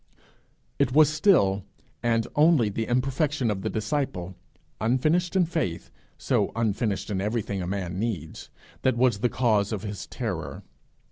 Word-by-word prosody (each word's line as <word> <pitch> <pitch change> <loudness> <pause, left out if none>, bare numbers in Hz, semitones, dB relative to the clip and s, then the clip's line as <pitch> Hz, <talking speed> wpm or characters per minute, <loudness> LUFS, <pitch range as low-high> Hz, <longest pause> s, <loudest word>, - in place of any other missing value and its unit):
It - - +2
was 150 0 +6
still 105 - +3 0.4
and 115 -1 +1
only 150 -7 +4
the 110 +2 -3
imperfection 130 0 0
of 95 -2 -3
the - - -2
disciple, 110 - -2 0.4
unfinished 155 - +1
in 185 -2 +4
faith, 160 - -3 0.3
so - - 0
unfinished 110 -2 -1
in 95 -2 -1
everything 105 -2 -2
a 90 - -4
man 95 -1 -3
needs, 100 -9 -4 0.3
that 130 -2 +2
was 120 -4 +3
the 120 +3 +1
cause 110 -5 +1
of 105 -2 -3
his 100 -2 -6
terror. - - -5
115 Hz, 145 wpm, -26 LUFS, 100-135 Hz, 0.4 s, was